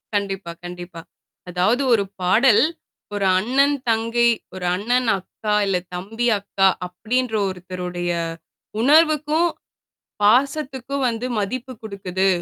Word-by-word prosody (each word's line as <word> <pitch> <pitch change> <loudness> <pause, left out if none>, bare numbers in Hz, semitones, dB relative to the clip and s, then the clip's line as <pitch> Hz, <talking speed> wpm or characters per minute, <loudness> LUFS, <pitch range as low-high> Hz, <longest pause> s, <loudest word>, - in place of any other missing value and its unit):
கண்டிப்பா, 195 -3 -2
கண்டிப்பா, 175 -1 -8 0.5
அதாவது 185 +9 +1
ஒரு 205 -3 +3 0.2
பாடல் 215 +8 +5 0.5
ஒரு 200 -1 0
அண்ணன் 275 +7 +2
தங்கை, 230 +1 +2 0.2
ஒரு 185 -1 -5
அண்ணன் 240 +5 0
அக்கா, 210 +3 -4
இல்ல 195 -2 +1 0.2
தம்பி, 225 +7 -2
அக்கா, 195 -1 +2 0.2
அப்பிடின்ற 225 +6 -2
ஒருத்தருடைய 180 -1 -4 0.7
உணர்வுக்கும், 310 +3 +4 0.8
பாசத்துக்கும் 270 +3 +1
வந்து 235 +2 -2
மதிப்பு 250 +5 -3
கொடுக்குது, 195 -2 -2
220 Hz, 100 wpm, -22 LUFS, 185-255 Hz, 0.8 s, பாடல்